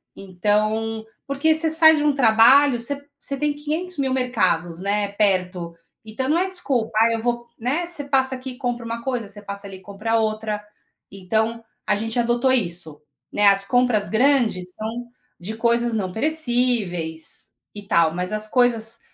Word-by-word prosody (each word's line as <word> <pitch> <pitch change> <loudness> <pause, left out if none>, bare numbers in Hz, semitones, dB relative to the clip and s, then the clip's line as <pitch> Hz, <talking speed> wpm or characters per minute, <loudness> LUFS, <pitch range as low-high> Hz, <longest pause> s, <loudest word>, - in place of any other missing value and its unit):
Então 215 +3 -1 0.2
porque 280 +3 +1
você 320 0 +2
sai 320 0 +7
de 295 - 0
um 295 -1 +3
trabalho, 245 +2 +5
você 285 +3 -5
você 275 - -5
tem 295 +1 0
quinhentos 310 +5 -4
mil 265 -2 0
mercados, 175 -10 0
né, 205 +1 -1
perto. 185 -4 0 0.3
Então 220 +4 -4
não 315 - +3
é 370 - 0
desculpa, 270 -11 -1
"Ah, 230 +1 +4
eu 225 - -2
vou", 240 0 -2
né. 275 +9 -1
Você 340 -4 -3
passa 265 -1 +1
aqui, 255 0 -8
compra 245 -3 -3
uma 230 0 -5
coisa, 245 -4 -3
você 205 +1 -6
passa 200 0 -6
ali, 190 -1 -10
compra 210 +4 -2
outra. 215 -1 -2 0.5
Então, 220 +4 -2 0.2
a - - +2
gente 225 +2 -4
adotou 240 +2 +1
isso. 170 - -2 0.3
Né, 205 0 +3
as 195 0 +4
compras 245 -2 +2
grandes 225 -7 +1
são 230 +3 -5 0.3
de 210 +6 -6
coisas 235 +1 +2
não 195 -4 -2
perecíveis, 240 - -1 0.2
e 205 - -8
tal. 170 -5 +3
Mas 180 +2 -3
as 215 0 +2
coisas 230 -1 +2
225 Hz, 165 wpm, -22 LUFS, 205-260 Hz, 0.5 s, sai